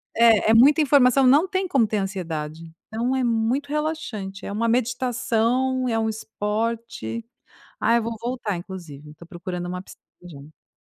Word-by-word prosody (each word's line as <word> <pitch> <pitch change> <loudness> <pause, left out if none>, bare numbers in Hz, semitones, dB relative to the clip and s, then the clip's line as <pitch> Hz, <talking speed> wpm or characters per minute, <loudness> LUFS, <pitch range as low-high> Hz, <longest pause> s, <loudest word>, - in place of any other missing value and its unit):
é 225 -2 +5
é - - +5
muita 280 +7 +6
informação, 270 -2 +5
não 290 +7 +5
tem 375 0 -2
como 265 -8 +3
ter 215 0 -2
ansiedade, 165 -5 -4 0.2
então 235 +4 -1
é 260 - 0
muito 240 +4 0
relaxante, 290 -11 -4
é - - -5
uma 230 +2 0
meditação, 250 +1 0
é 225 -1 0
um 220 - 0
esporte, 225 +1 -3 0.5
ah, 230 - +3
eu 235 - +2
vou 230 0 -3
voltar 235 -5 -3
inclusive, 165 -6 -9
estou 155 +3 -14
procurando 175 0 -6
uma 180 0 -4
piscina - - -16 0.2
já. 150 -2 -14
225 Hz, 160 wpm, -23 LUFS, 190-255 Hz, 0.5 s, muita